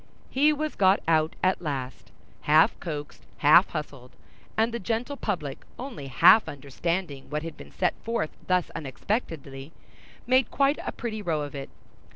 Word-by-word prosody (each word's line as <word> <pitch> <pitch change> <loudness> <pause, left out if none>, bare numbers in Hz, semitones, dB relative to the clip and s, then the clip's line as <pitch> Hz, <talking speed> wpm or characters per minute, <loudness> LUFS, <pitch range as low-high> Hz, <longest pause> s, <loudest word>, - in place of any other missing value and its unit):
He 290 +3 +4
was 305 +1 -2
got 190 0 +4
out 160 -1 +2
at 185 0 +2
last, 130 - -5 0.3
half 155 +2 +4
coaxed, 150 -4 -6 0.2
half 155 +6 +6
hustled; 140 -5 -6 0.5
and 225 +1 +2
the 235 - -2
gentle 230 +7 -2
public 170 - -4
only 240 - -7
half 160 - +6
understanding 145 +2 -4
what 150 +1 -3
had 165 - -6
been - - -12
set 180 - 0
forth 230 -8 -1 0.2
thus 180 -1 +1
unexpectedly, 140 - -4 0.5
made 255 +1 +3
quite 280 +1 +2
a - - -3
pretty 220 -3 -5
row 165 -6 -1
of 145 - -7
it. 135 -1 -6
165 Hz, 155 wpm, -26 LUFS, 145-225 Hz, 0.5 s, half